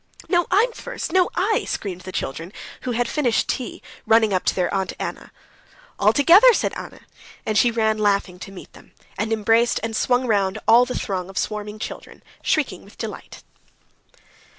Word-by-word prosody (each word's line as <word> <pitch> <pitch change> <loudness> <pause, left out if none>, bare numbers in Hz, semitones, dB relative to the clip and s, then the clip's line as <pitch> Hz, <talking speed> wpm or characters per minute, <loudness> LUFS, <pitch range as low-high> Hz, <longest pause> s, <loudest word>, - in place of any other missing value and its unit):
"No, 350 0 +2
I'm 430 +7 +3
first! 455 - -6
No, 370 -1 +4
I!" 415 +4 +1
screamed 185 -3 -4
the 185 - -8
children, 165 +3 -4 0.3
who 250 - -3
had 240 +1 0
finished 255 -6 +1
tea, 250 - -4 0.2
running 220 -2 +4
up 185 - 0
to - - +1
their 180 -2 0
Aunt 195 -1 -1
Anna. - - -6 0.7
"All - - +5
together," 360 - +7
said - - -1
Anna, - - -9 0.4
and 215 - -1
she 240 +3 +5
ran 220 -2 0
laughing 200 -3 0
to 195 - -9
meet 190 - -12
them, - - -18 0.2
and 215 +3 -2
embraced 225 +2 +2
and 225 -1 -3
swung 245 +3 +1
round 200 -3 +1
all 240 +2 +7
the 250 - -4
throng 185 -3 -3
of 195 - -10
swarming 210 0 -3
children, 215 - -8 0.2
shrieking - - 0
with - - -18
delight. - - -8
220 Hz, 175 wpm, -22 LUFS, 195-250 Hz, 0.7 s, together